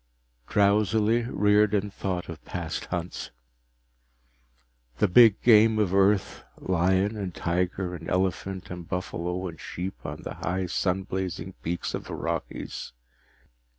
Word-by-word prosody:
_ - - -18
Drowsily, 105 +3 +3
Riordan 105 -1 +3
thought 90 -2 -3
of 85 -2 -9
past - - -4
hunts. 90 0 -4 1.7
The 105 - +3
big 110 +2 +7
game 110 -1 +6
of 100 -4 +1
Earth, 100 0 +2
lion 95 +3 +1
and 95 -4 -5
tiger 90 +1 -1
and 85 -2 -7
elephant 95 0 -1
and 90 -2 -7
buffalo 90 0 -3
and 80 -5 -9
sheep 95 +3 -6
on 75 +2 -6
the - - -5
high 95 +2 -2
sun 90 +2 0
blazing 95 -1 -4
peaks 85 +1 -3
of - - -4
the - - -5
Rockies. - - -4
95 Hz, 130 wpm, -27 LUFS, 90-105 Hz, 1.7 s, big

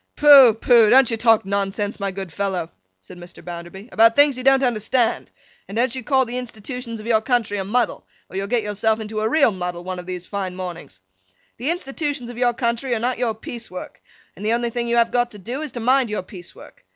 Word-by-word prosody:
'Pooh, 275 -6 +8
pooh! 225 -1 +5
Don't 255 0 +6
you - - +1
talk 225 -2 +3
nonsense, 200 +1 -2
my 200 0 -1
good 190 -3 -7
fellow,' 190 -4 -2 0.3
said 95 - -13
Mr. 175 -1 -13
Bounderby, 175 +4 -9
'about 230 +1 +5
things 285 -1 +5
you 255 - -5
don't 270 0 +4
understand; 240 0 0 0.4
and 200 - -8
don't 235 +1 +1
you 260 - -5
call 265 +1 +2
the 245 +1 -4
Institutions 235 0 -7
of 215 - -10
your 225 -2 +2
country 225 -4 0
a - - -2
muddle, 230 +4 -1 0.2
or - - -13
you'll 195 +1 -2
get 235 0 0
yourself 215 +2 0
into 215 0 -5
a 215 +1 0
real 280 -3 +4
muddle 180 -2 -5
one 185 0 -5
of 180 - -10
these 180 -1 -6
fine 190 -2 -4
mornings. 170 - -8 0.6
The 255 +6 -3
institutions 290 -6 -3
of 240 - -12
your 245 -1 +2
country 235 +1 -1
are - - -2
not 245 +1 -2
your 235 -3 0
piece 230 +1 -8
work, 180 - -9 0.3
and 200 - -10
the 220 +2 +1
only 235 0 -1
thing 235 0 -3
you 235 - 0
have 235 0 +3
got 245 -1 +1
to 210 - -12
do, 240 +9 -6
is, 305 -3 -5
to 240 - -5
mind 255 +1 +2
your 210 -3 -3
piece 180 -2 -12
work. - - -16
225 Hz, 235 wpm, -21 LUFS, 195-245 Hz, 0.6 s, Pooh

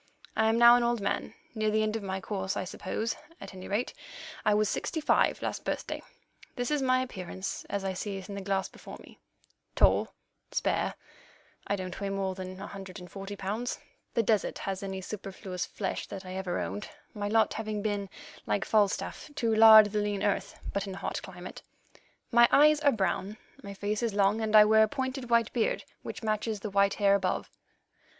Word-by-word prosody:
I 220 0 +3
am 225 - +2
now 235 0 +9
an - - +1
old 235 0 +1
man, 200 - -2 0.2
near 215 -2 0
the 215 0 +2
end 215 0 -1
of 225 - -2
my 190 -1 -3
course, 190 -1 -3
I - - -1
suppose; 205 +4 -3 0.2
at - - -9
any 185 0 -9
rate, 210 +5 -1 0.5
I 210 - +3
was 210 0 +3
sixty 320 - -2
five 305 - +3
last - - -3
birthday. - - -3 0.5
This 245 +3 -2
is 295 -2 +1
my 255 -1 +3
appearance 190 -5 -6
as 200 -1 -2
I 190 - -1
see 195 +1 -4
it 190 - -8
in 200 - -7
the 200 - -5
glass 195 0 0
before - - -11
me: - - -16 0.6
tall, - - +4 0.4
spare - - 0 0.7
(I 200 - +1
don't 185 -1 -6
weigh 200 - -1
more 195 -1 -1
than 185 0 -7
a 200 - -6
hundred 195 -1 -9
and 180 0 -11
forty 195 +1 -6
pounds—the 230 - -4
desert 215 -1 +1
has 195 -1 -4
any 190 -1 -4
superfluous 190 -2 -5
flesh 195 - -4
that 195 -1 -8
I 185 - -7
ever 185 -2 -2
owned, 210 - -4 0.2
my 205 -1 -3
lot 220 +1 +3
having 215 -2 -3
been, 205 -2 -2 0.4
like 200 - 0
Falstaff, 210 +6 0
to 230 -4 +1
lard 220 -1 +9
the 210 0 0
lean 205 -1 -1
earth, 205 - -1
but 200 0 -1
in 190 - -5
a - - -8
hot - - -3
climate); 180 -1 -9 0.7
my 235 0 +7
eyes 300 +1 +6
are 290 -2 +4
brown, 200 0 -1 0.2
my 200 -1 -8
face 205 +2 -2
is 230 -4 -1
long, 205 +2 +3
and 220 0 +1
I 210 0 +10
wear 220 +1 +5
a 220 - +6
pointed 260 0 -4
white 235 -1 +3
beard, 230 -3 0 0.2
which - - -7
matches 215 -1 -1
the 215 - -4
white 200 0 +3
hair 200 -1 +4
above. 190 -2 0
205 Hz, 200 wpm, -29 LUFS, 195-220 Hz, 0.7 s, I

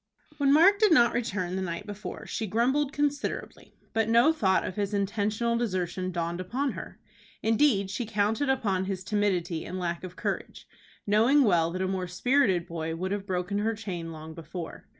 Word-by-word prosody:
When 280 -1 +4
Mark 365 +7 +6
did 430 -3 +5
not 240 -7 +5
return 190 -7 -2
the 190 - -2
night 170 +1 -4
before 205 -2 -7
she 220 - -3
grumbled 265 +7 +1
considerably, 290 0 -3 0.2
but 225 0 +1
no 235 +8 +5
thought 190 -11 +2
of 185 - -5
his 205 0 -1
intentional 210 +3 0
desertion 185 -4 -2
dawned 170 0 -2
upon 255 +9 -1
her. - - -9 0.4
Indeed, 220 -4 +3
she 215 +4 -3
counted 220 +6 0
upon 200 -8 +1
his 190 -1 -4
timidity 185 -5 0
and 185 - -6
lack 175 -1 -3
of 180 -1 -8
courage, - - -4 0.4
knowing 230 +8 +4
well 170 -7 +3
that 185 +2 -3
a - - 0
more 185 -1 -2
spirited 190 -2 +2
boy 165 -1 -4
would 185 +3 -3
have 200 -1 -3
broken 185 +2 -1
her 220 +2 0
chain 180 -6 -5
long 160 0 -9
before. 165 +1 -8
200 Hz, 180 wpm, -28 LUFS, 180-235 Hz, 0.4 s, Mark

